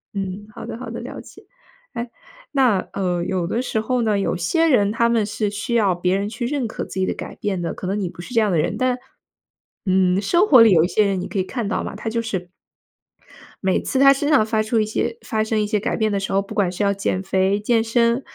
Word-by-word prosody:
嗯， 195 Hz, +1 st, -4 dB
好 -, -, -8 dB
的 -, -, -6 dB
好 255 Hz, -, -7 dB
的， -, -, -6 dB
了 -, -, -7 dB
解。 -, -, -15 dB, 0.5 s
诶， 235 Hz, +1 st, -4 dB, 0.4 s
那， 255 Hz, -8 st, +3 dB
呃， 180 Hz, -3 st, -1 dB
有 180 Hz, 0 st, -1 dB
的 230 Hz, +7 st, -1 dB
时 240 Hz, -3 st, -2 dB
候 250 Hz, +2 st, 0 dB
呢， 215 Hz, -3 st, +1 dB
有 195 Hz, -, 0 dB
些 325 Hz, -, +1 dB
人 210 Hz, -9 st, +3 dB
他 235 Hz, +1 st, +2 dB
们 230 Hz, -2 st, +2 dB
是 210 Hz, 0 st, -2 dB
需 220 Hz, +4 st, -3 dB
要 205 Hz, -5 st, +3 dB
别 180 Hz, +1 st, 0 dB
人 200 Hz, +1 st, -1 dB
去 240 Hz, +2 st, -4 dB
认 270 Hz, -3 st, -1 dB
可 220 Hz, -, -5 dB
自 -, -, -11 dB
己 185 Hz, -, +2 dB
的 -, -, -1 dB
改 -, -, -8 dB
变 195 Hz, -4 st, -3 dB
的， 170 Hz, -, -3 dB
可 -, -, -8 dB
能 200 Hz, +2 st, -1 dB
你 190 Hz, -3 st, -2 dB
不 175 Hz, -, -10 dB
是 210 Hz, -, -10 dB
这 230 Hz, -, +4 dB
样 210 Hz, -2 st, +1 dB
的 175 Hz, -, +2 dB
人。 195 Hz, -, -1 dB
但 255 Hz, 0 st, +1 dB, 0.9 s
嗯， 185 Hz, 0 st, +2 dB
生 345 Hz, -, +3 dB
活 260 Hz, -, +8 dB
里 225 Hz, -2 st, +7 dB
有 165 Hz, -4 st, +5 dB
一 -, -, +2 dB
些 210 Hz, +3 st, +2 dB
人 195 Hz, -2 st, 0 dB
你 180 Hz, -, -4 dB
可 210 Hz, -, -6 dB
以 -, -, +2 dB
看 230 Hz, +3 st, -4 dB
到 205 Hz, -, -1 dB
嘛， -, -, -6 dB
他 225 Hz, -, -4 dB
就 230 Hz, +1 st, -1 dB
是 190 Hz, -6 st, -4 dB, 1.2 s
每 190 Hz, -, +2 dB
次 -, -, -2 dB
他 275 Hz, +1 st, +7 dB
身 275 Hz, +1 st, 0 dB
上 290 Hz, -8 st, +4 dB
发 220 Hz, 0 st, 0 dB
出 220 Hz, +2 st, -1 dB
一 -, -, +1 dB
些 225 Hz, +2 st, -2 dB
发 220 Hz, -, -2 dB
生 220 Hz, 0 st, 0 dB
一 -, -, +1 dB
些 210 Hz, 0 st, 0 dB
改 200 Hz, -, -2 dB
变 220 Hz, -1 st, 0 dB
的 200 Hz, -, 0 dB
时 195 Hz, -, -3 dB
候， 195 Hz, -, +3 dB
不 200 Hz, +2 st, -9 dB
管 200 Hz, -4 st, +1 dB
是 180 Hz, +3 st, -3 dB
要 200 Hz, 0 st, +2 dB
减 195 Hz, -1 st, -2 dB
肥、 190 Hz, +1 st, +1 dB
健 230 Hz, +1 st, +3 dB
身， 235 Hz, +2 st, +2 dB
210 Hz, 285 characters per minute, -21 LUFS, 190-235 Hz, 1.2 s, 活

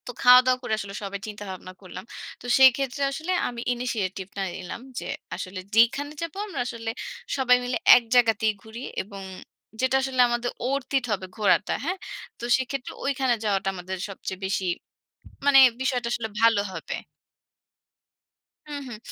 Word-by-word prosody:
তো -, -, -3 dB
খাওয়া-দাওয়া 250 Hz, +1 st, +7 dB
করে 245 Hz, -3 st, -2 dB
আসলে 200 Hz, -1 st, -6 dB
সবাই 200 Hz, 0 st, -4 dB
চিন্তা 210 Hz, -1 st, -7 dB
ভাবনা 185 Hz, 0 st, -9 dB
করলাম। 185 Hz, 0 st, -9 dB, 0.4 s
তো -, -, -12 dB
সেই 265 Hz, -1 st, +9 dB
ক্ষেত্রে 275 Hz, +1 st, -3 dB
আসলে 315 Hz, +6 st, -3 dB, 0.2 s
আমি 240 Hz, -1 st, -5 dB
ইনিশিয়েটিভ 210 Hz, -7 st, -3 dB
টা -, -, -1 dB
নিলাম 185 Hz, +5 st, -7 dB, 0.2 s
যে, -, -, -7 dB, 0.3 s
আসলে 185 Hz, 0 st, -6 dB, 0.2 s
যেইখানে 270 Hz, +6 st, +4 dB
যাবো 335 Hz, +2 st, -5 dB
আমরা 375 Hz, -10 st, -6 dB
আসলে, 230 Hz, -2 st, -5 dB, 0.5 s
সবাই 250 Hz, -2 st, +5 dB
মিলে 245 Hz, 0 st, -1 dB, 0.2 s
এক 245 Hz, -, +4 dB
জায়গাতেই 225 Hz, -3 st, +4 dB
ঘুরি। 220 Hz, +2 st, -9 dB, 0.2 s
এবং 200 Hz, 0 st, -10 dB, 0.6 s
যেটা 260 Hz, +1 st, +2 dB
আসলে 265 Hz, -1 st, +1 dB
আমাদের 240 Hz, 0 st, -1 dB, 0.2 s
অরথ 275 Hz, -1 st, -2 dB
ইট 260 Hz, -, -1 dB
হবে 190 Hz, -2 st, -1 dB
ঘোরাটা। 210 Hz, -1 st, +3 dB
হ্যাঁ? 370 Hz, +4 st, -1 dB, 0.4 s
তো -, -, -10 dB
সেক্ষেত্রে 260 Hz, 0 st, -4 dB
ঐখানে 270 Hz, -2 st, +1 dB
যাওয়াটা 195 Hz, -2 st, 0 dB
আমাদের 185 Hz, +1 st, -5 dB
সবচেয়ে 190 Hz, -1 st, -6 dB
বেশি, 195 Hz, 0 st, -1 dB, 0.8 s
মানে 285 Hz, -1 st, +6 dB, 0.2 s
বিষয়টা 255 Hz, -3 st, 0 dB
আসলে 220 Hz, -2 st, -2 dB
ভালো 230 Hz, -2 st, +5 dB
হবে। -, -, -6 dB, 1.8 s
হুম, 290 Hz, -1 st, -4 dB
হুম। 240 Hz, -3 st, -7 dB
240 Hz, 155 wpm, -25 LUFS, 200-260 Hz, 1.8 s, সেই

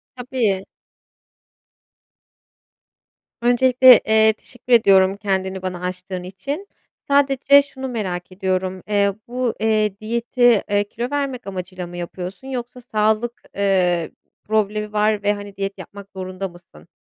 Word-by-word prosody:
Tabii. 240 Hz, -6 st, -1 dB, 2.8 s
Öncelikle, 250 Hz, +1 st, +6 dB
eee, 220 Hz, 0 st, +5 dB
teşekkür 245 Hz, +3 st, -5 dB
ediyorum 195 Hz, -4 st, +5 dB
kendini 190 Hz, -2 st, -2 dB
bana 185 Hz, -1 st, -5 dB
açtığın 180 Hz, 0 st, -5 dB
için. 275 Hz, -, -6 dB, 0.4 s
Sadece 280 Hz, 0 st, +5 dB
şunu 265 Hz, -1 st, -7 dB
merak 190 Hz, -7 st, -4 dB
ediyorum, 185 Hz, -1 st, -2 dB
eee, 200 Hz, -1 st, +2 dB
bu, 245 Hz, -1 st, -1 dB
eee, 215 Hz, -2 st, +1 dB
diyeti, 235 Hz, +1 st, +2 dB
eee, 205 Hz, 0 st, +2 dB
kilo 235 Hz, +4 st, -5 dB
vermek 275 Hz, -5 st, -3 dB
amacıyla 185 Hz, -1 st, -6 dB
mı 175 Hz, 0 st, -9 dB
yapıyorsun 180 Hz, +7 st, -7 dB
yoksa 250 Hz, -1 st, -6 dB
sağlık, 220 Hz, +1 st, 0 dB
eee, 180 Hz, -4 st, +1 dB, 0.3 s
problemi 210 Hz, 0 st, -1 dB
var 210 Hz, -1 st, +1 dB
ve, 205 Hz, 0 st, +3 dB
hani, 205 Hz, -1 st, -9 dB
diyet 195 Hz, 0 st, -4 dB
yapmak 200 Hz, +2 st, -11 dB
zorunda 185 Hz, +1 st, -5 dB
mısın? 170 Hz, -, -18 dB
205 Hz, 120 wpm, -21 LUFS, 190-240 Hz, 2.8 s, Öncelikle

